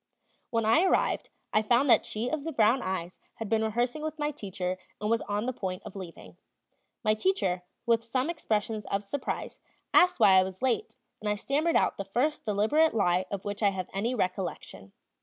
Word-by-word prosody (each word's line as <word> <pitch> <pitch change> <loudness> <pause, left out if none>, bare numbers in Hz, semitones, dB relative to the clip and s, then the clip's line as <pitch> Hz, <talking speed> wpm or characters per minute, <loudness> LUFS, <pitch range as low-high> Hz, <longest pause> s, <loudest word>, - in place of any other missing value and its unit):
When 230 -3 0
I 225 +9 +5
arrived, 375 - +1 0.2
I 215 - +4
found 240 +6 +3
that - - +5
she 220 +3 -2
of 300 +2 -2
the 325 - -3
brown 235 -1 +3
eyes 185 -2 -4 0.2
had 225 - -5
been 220 -1 +2
rehearsing 240 +6 -1
with 310 0 -4
my 295 0 -1
teacher 185 -7 -4 0.2
and 210 +1 -1
was 230 - +2
on 205 +2 -1
the 255 - -1
point 185 -5 -4
of - - -10
leaving. 185 -4 -10 0.7
My 215 -1 +4
teacher, 215 - 0 0.2
with 230 -1 +3
some 255 +4 -1
expressions 220 -9 -2
of 200 +1 -1
surprise, 260 +7 -4 0.3
asked 360 0 +5
why 190 -1 +7
I - - +4
was 190 +4 -7
late, 260 - 0 0.2
and 210 - -3
I 210 - +1
stammered 295 +9 0
out - - +2
the 200 - -3
first 255 +10 0
deliberate 220 +9 +2
lie 185 -3 +2
of 200 -2 -5
which 205 +1 -4
I 205 - +5
have 190 -2 -5
any 225 +6 -1
recollection. 180 - -3
220 Hz, 195 wpm, -29 LUFS, 195-260 Hz, 0.7 s, why